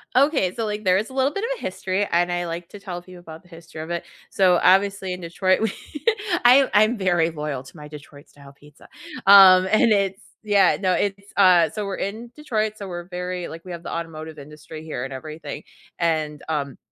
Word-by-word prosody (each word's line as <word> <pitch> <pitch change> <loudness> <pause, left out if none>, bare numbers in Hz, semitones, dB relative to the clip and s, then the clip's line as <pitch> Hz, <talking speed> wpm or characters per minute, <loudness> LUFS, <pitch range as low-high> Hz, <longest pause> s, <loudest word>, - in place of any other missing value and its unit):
Okay, 270 - +2
so, 230 - -2
like, 210 0 -4
there 185 -1 +3
is 210 +3 -3
a - - -12
little 270 +2 +1
bit 400 - -4
of - - -2
a - - -15
history, 190 +2 -2
and 175 +1 +2
I 175 0 -2
like 170 0 -6
to 205 - -11
tell 180 -3 -7
people 180 0 -14
about 165 0 -12
the 180 - -23
history 165 -2 -11
of 160 - -8
it. 170 -1 -3 0.3
So, 185 -2 +3
obviously, 195 0 +3
in 180 - -8
Detroit, 185 +3 0
we 220 -3 0 0.7
I'm 260 +2 +6
I'm 215 +3 +4
very 175 -4 +1
loyal 150 -4 -5
to 135 - -15
my 150 0 -10
Detroit-style 145 -1 -14
pizza, 145 +2 -19 0.4
um, 190 -2 +8
and 215 +1 +4
it's 195 -1 +1 0.2
yeah, 205 -2 +3
no, 185 -2 +1
it's, 200 +1 -3
uh, 180 -4 +5
so 210 +3 -4
we're 195 -1 -4
in 225 +4 -5
Detroit, 220 -8 -2
so 200 - -7
we're 175 -1 -6
very 180 -1 -5
like, 165 +2 -10
we 180 - -8
have 170 -1 -8
the - - -6
automotive 160 -2 -6
industry 150 +2 -11
here 155 -6 -5
and 135 - -6
everything, 155 +4 -8 0.4
and, 155 -3 -1
um, 145 -3 -3
180 Hz, 215 wpm, -22 LUFS, 160-200 Hz, 0.7 s, um